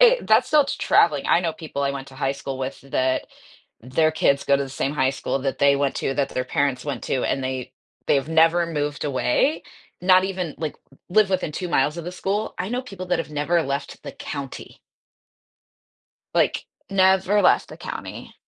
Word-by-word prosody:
Eh, - - +7
that's - - +4
still 300 -3 +5
t - - -3
traveling, 145 -4 +3
I 170 - +5
know 165 -2 -1
people 155 -3 -5
I 140 - +1
went 135 -1 -7
to 135 - -14
high 135 0 0
school 135 -1 -6
with 130 0 -4
that 130 -1 0 0.5
their 145 +7 +1
kids 140 -3 +2
go 140 - +4
to 140 - -1
the 135 - -5
same 135 +1 -2
high 130 -2 +2
school 135 - -2
that 135 0 -2
they 140 0 +4
went 140 -1 0
to, 135 - -1
that 140 -1 0
their 125 - -2
parents 140 -2 0
went 140 -5 -4
to, 130 - -1
and 135 - -1
they 130 -1 -4 0.3
they've 140 +1 +2
never 165 +2 +4
moved 145 -3 -3
away. 145 - +1 0.4
Not 185 0 +5
even, 185 -5 -3
like, 155 -2 -4 0.3
live 205 +1 +3
within 185 -5 -1
2 180 +3 -4
miles 150 0 +1
of 170 - -6
the 175 - -4
school. 200 +4 -2
I 185 - -2
know 245 +3 -2
people 195 -7 -8
that 180 -1 +1
have - - -7
never 150 +3 +1
left 140 0 -4
the - - -7
county. 140 -3 -7 1.5
Like, - - +2 0.3
never 190 +1 +4
left - - +4
the - - -10
county. - - -8
150 Hz, 200 wpm, -23 LUFS, 135-180 Hz, 1.5 s, Eh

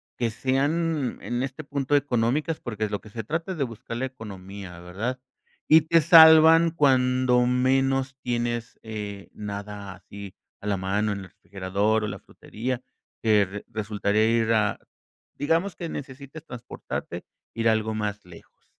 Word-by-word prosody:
que 120 -2 0
sean 140 +4 0
en 120 0 -2
este 135 +3 -4
punto 140 -1 -1
económicas? 140 +3 +1
Porque 110 -3 -5
es 105 - -6
lo 105 - -3
que 110 - -14
se 110 +2 -6
trata 165 - -3
es - - -8
de 145 - +1
buscar 115 -1 -6
la 130 - -1
economía, 100 -7 -9
¿verdad? 100 +9 -4 0.5
Y 160 +1 +7
te 165 +2 +3
salvan 160 0 +8
cuando 130 -4 +3
menos 135 +1 +1
tienes, 120 -1 -2
eh, 105 -3 -6
nada 100 -1 -6
así 100 +1 -11 0.3
a 105 - -6
la 100 -1 +1
mano 100 +3 0
en 100 - -5
el - - -9
refrigerador, 100 +3 -1
o - - -1
la 105 - -6
frutería, 120 +3 -5 0.4
que 105 -2 +2
resultaría 105 0 0
ir 115 -1 +2
a 110 -2 +2 0.6
digamos 165 +6 0
que 170 - -6
necesites 140 +2 -8
transportarte, 120 -3 -6 0.3
ir 115 0 +1
algo 110 0 +1
más 105 -1 -3
lejos. 90 -2 -17
120 Hz, 155 wpm, -25 LUFS, 105-135 Hz, 0.6 s, salvan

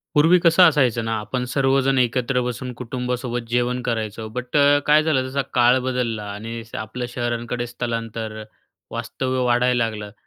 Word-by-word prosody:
पूर्वी 165 +5 +6
कसं 170 +2 +6
असायचं 125 -6 +1
ना 115 - -1
आपण 110 +4 -3
सर्वजण 135 0 +2
एकत्र 125 +1 +1
बसून 125 +1 -4
कुटुंबासोबत 125 0 -3
जेवण 125 +1 0
करायचो. 110 -2 -3
बट 125 +5 -3 0.3
काय 150 +1 +5
झालं, 155 -4 +2
जसा 140 +2 -1
काळ 125 +1 +5
बदलला. 120 -4 -1
आणि 115 +3 -6 0.2
आपलं 110 +3 -5
शहरांकडे 120 0 -3
स्थलांतर 115 -2 -4 0.6
वास्तव्य 125 +2 -2
वाढायला 120 0 +2
लागलं. 105 -2 -6
125 Hz, 140 wpm, -22 LUFS, 115-130 Hz, 0.6 s, पूर्वी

